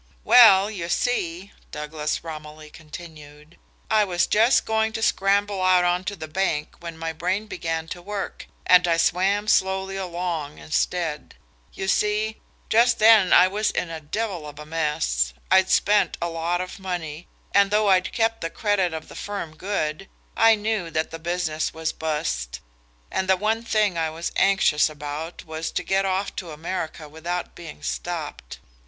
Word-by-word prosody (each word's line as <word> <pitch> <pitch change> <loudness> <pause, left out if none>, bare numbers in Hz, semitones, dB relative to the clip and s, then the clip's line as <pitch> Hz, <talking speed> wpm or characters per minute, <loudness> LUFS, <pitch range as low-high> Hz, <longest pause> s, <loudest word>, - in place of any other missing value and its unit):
"Well, 205 -4 +7
you 175 -5 -5
see," 185 -4 -1 0.2
Douglas 150 0 -4
Romilly 155 -1 -9
continued, 155 -1 -12 0.3
"I 215 -1 +5
was 175 -3 +1
just 225 +4 +3
going 220 0 0
to 225 - -4
scramble 200 0 +1
out 185 -1 +4
on 175 +1 +1
to 205 - -3
the 155 -4 -7
bank 155 -2 -1
when 170 -1 -8
my 165 0 -4
brain 185 +6 -2
began 165 -5 -4
to 175 - -7
work, 200 +2 -6 0.2
and 180 -1 +6
I 165 -1 +2
swam 195 +5 +1
slowly 190 -1 +1
along 170 -5 -4
instead. 160 0 -2 0.4
You 190 - -5
see, 210 +2 0 0.3
just 235 +1 +4
then 215 -4 +6
I 180 - +7
was 210 +3 0
in 170 - -3
a 160 -1 -6
devil 180 0 -4
of 145 -1 -11
a 150 - -9
mess. 150 - -1 0.2
I'd 190 0 +5
spent 210 0 +3
a 170 - -2
lot 170 +2 -1
of 185 +2 -7
money, 175 -4 -5 0.3
and 200 0 +5
though 210 0 +2
I'd 185 -1 +3
kept 225 0 0
the 165 - -2
credit 190 -4 0
of 160 - -7
the - - -12
firm 195 -6 -6
good, 190 -1 -3 0.3
I 225 0 +6
knew 210 -4 -2
that 155 0 -2
the 165 - -7
business 165 -2 -2
was 160 0 -2
bust, 150 - -3 0.5
and 190 - -1
the 190 - +5
one 220 +3 0
thing 215 -6 +1
I 160 -1 0
was 165 +2 -5
anxious 195 -6 +3
about 150 +2 -7
was 160 0 -4
to - - -3
get 195 0 +1
off 190 +1 -1
to 180 - -5
America 160 0 -5
without 170 +4 -5
being 120 - -11
stopped. - - -5
175 Hz, 170 wpm, -24 LUFS, 160-200 Hz, 0.5 s, Well